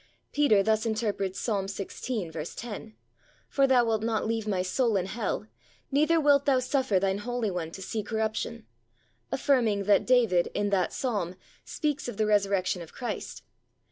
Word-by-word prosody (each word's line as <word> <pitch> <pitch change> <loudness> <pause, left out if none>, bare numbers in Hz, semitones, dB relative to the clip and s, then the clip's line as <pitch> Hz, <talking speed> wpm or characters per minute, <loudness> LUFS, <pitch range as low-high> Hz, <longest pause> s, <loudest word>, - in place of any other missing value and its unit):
Peter 250 -9 +4
thus 220 +1 +2
interprets 215 -4 -1
Psalm 200 -4 -1
xvi. 195 -4 -4
10, 220 -2 -7 0.5
"For 275 -1 +3
thou 250 -2 +4
wilt 220 -2 +1
not 225 -1 0
leave 225 -1 -1
my 190 -3 0
soul 225 +3 +1
in 185 - 0
hell; 210 +1 -3 0.5
neither 305 +4 +3
wilt 285 -2 +4
thou 275 -2 +4
suffer 255 -5 +1
thine 195 +1 0
Holy 240 -1 -2
One 175 -3 -3
to 190 +3 -8
see 220 +3 -3
corruption," 220 - -3 0.7
affirming 230 -8 +2
that 205 +1 +3
David 230 -9 +4
in 205 0 0
that 185 -4 +2
Psalm 205 -9 -2 0.3
speaks 300 -3 -2
of 240 - -5
the 215 - +2
Resurrection 200 -3 +1
of 165 - -10
Christ. 245 - -5
215 Hz, 160 wpm, -28 LUFS, 195-245 Hz, 0.7 s, Peter